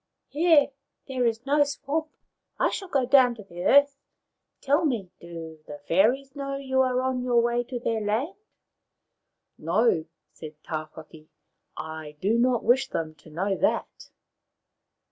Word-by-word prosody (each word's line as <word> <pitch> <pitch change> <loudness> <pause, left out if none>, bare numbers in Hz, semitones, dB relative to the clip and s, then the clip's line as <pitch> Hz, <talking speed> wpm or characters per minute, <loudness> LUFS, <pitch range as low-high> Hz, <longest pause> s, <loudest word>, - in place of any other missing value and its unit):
Here 310 -2 +4 0.4
there 255 -3 0
is 230 +2 -2
no 290 +1 +4
swamp. 290 +2 -3 0.5
I - - +2
shall 390 - -5
go 275 -7 +1
down 250 -2 +5
to 215 - -11
the 175 -2 -8
earth. 280 0 +5 0.6
Tell 290 +4 +2
me, 230 - -1
do 165 -2 -9
the 145 - -8
fairies 255 - +2
know 275 -1 -4
you 265 -1 0
are 255 -1 +1
on 260 -1 -1
your 245 -1 +2
way 240 +1 +1
to 245 0 -5
their 225 -2 -1
land? 225 - -1 0.4
" - - -57 0.2
" - - -56 0.3
No," 175 0 +2 0.3
said 155 -1 -10
Tawhaki. 155 0 -8 0.4
" - - -46
I 155 -1 -7
do 215 +7 +1
not 245 -1 +2
wish 265 +2 +3
them 160 -1 -3
to 160 - -16
know 190 +6 -1
that." - - -2
240 Hz, 160 wpm, -26 LUFS, 175-275 Hz, 0.6 s, down